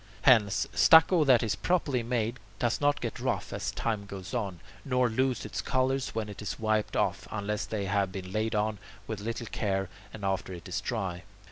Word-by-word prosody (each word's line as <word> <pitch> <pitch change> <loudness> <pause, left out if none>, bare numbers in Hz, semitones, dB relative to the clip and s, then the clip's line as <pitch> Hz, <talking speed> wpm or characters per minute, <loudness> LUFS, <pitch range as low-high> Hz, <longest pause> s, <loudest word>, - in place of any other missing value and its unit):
8. - - -14
Hence, 110 -8 +5
stucco 165 +1 +7
that 125 -4 +5
is 110 - 0
properly 150 -8 +1
made 115 0 -1 0.2
does 120 +2 0
not 145 0 +2
get 115 -2 -4
rough - - -2
as - - -2
time 105 -3 -2
goes 95 +1 -8
on, 100 -8 -2 0.2
nor 125 -2 +2
lose 130 +2 0
its - - -3
colours 130 -1 0
when 110 -1 -1
it 105 -1 -8
is 105 - -4
wiped 110 -1 0
off, - - 0
unless 105 0 -2
they 105 -3 -2
have 95 0 +1
been 95 -1 -6
laid 110 +2 -1
on 105 -1 0 0.3
with 110 -1 -4
little 115 +2 -4
care 95 -3 -1 0.2
and 105 -2 -7
after 95 -1 -1
it 85 -2 -9
is - - -2
dry. 90 -2 -3
110 Hz, 200 wpm, -29 LUFS, 100-125 Hz, 0.3 s, stucco